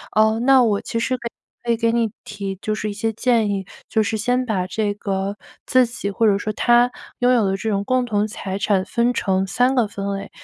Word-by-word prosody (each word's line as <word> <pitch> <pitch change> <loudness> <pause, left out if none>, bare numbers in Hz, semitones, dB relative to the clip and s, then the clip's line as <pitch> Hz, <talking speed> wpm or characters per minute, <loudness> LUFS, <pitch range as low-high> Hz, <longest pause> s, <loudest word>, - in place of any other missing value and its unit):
呃， 220 +1 +4
那 260 0 +6
我 210 -4 +2
其 230 - -3
实 255 +2 0
可 240 -1 -5
以 - - -9 0.4
可 - - +5
以 230 - +2
给 230 0 +2
你 230 -2 +1
提 200 -2 -5
就 215 - -1
是 215 0 -3
一 - - -5
些 225 +2 -1
建 230 -1 +1
议， 195 -2 -2 0.2
就 220 -1 +2
是 220 +2 -1
先 245 +4 0
把 190 -6 -1
这 205 +2 -1
个 195 0 -3 0.3
自 255 -2 +4
己 205 -4 -4
或 220 +3 +2
者 200 -1 +4
说 215 +1 -3
他 240 +2 +4 0.3
拥 250 0 +3
有 235 -4 +3
的 195 0 0
这 220 - -3
种 200 -1 0
共 255 +1 +1
同 210 -3 0
财 195 -2 -5
产 200 -3 +2
分 240 +1 +1
成 190 0 0
3 250 +6 +2
个 245 -5 +2
分 200 0 -4
类， 195 +1 -6
215 Hz, 255 characters per minute, -21 LUFS, 200-240 Hz, 0.4 s, 那